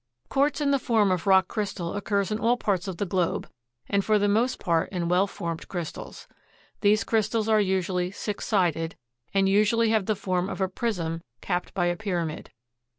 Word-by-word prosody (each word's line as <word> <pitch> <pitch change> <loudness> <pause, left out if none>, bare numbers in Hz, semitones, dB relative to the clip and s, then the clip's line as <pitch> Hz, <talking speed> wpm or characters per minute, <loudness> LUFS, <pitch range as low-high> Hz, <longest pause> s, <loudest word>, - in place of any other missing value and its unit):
Quartz 285 +3 +2
in 285 -1 +1
the 275 - +3
form 220 -6 +2
of 180 +1 -1
rock 190 -1 +5
crystal 195 -5 -3
occurs 200 0 -1
in 215 - -1
all 235 +2 +2
parts 195 -5 -1
of 185 -3 -4
the 205 - -1
globe, 180 -2 -1 0.4
and 200 -1 +1
for 215 +1 +3
the 205 0 +2
most 225 +5 +2
part 165 -4 +1
in 175 -3 -2
well 180 +3 +3
formed 170 -4 -5
crystals. 175 -4 -6 0.5
These 210 +1 +3
crystals 220 0 0
are 215 -1 +4
usually 185 -2 0
six 205 +1 -5
sided, 165 -6 +1 0.4
and 195 -1 +3
usually 215 +3 +3
have 215 -4 +1
the 215 - +2
form 185 -2 -1
of - - -5
a 190 - +2
prism 180 -5 -2 0.2
capped 180 0 -3
by 175 -3 +1
a 175 0 +1
pyramid. 175 -6 -3
195 Hz, 190 wpm, -26 LUFS, 180-215 Hz, 0.5 s, rock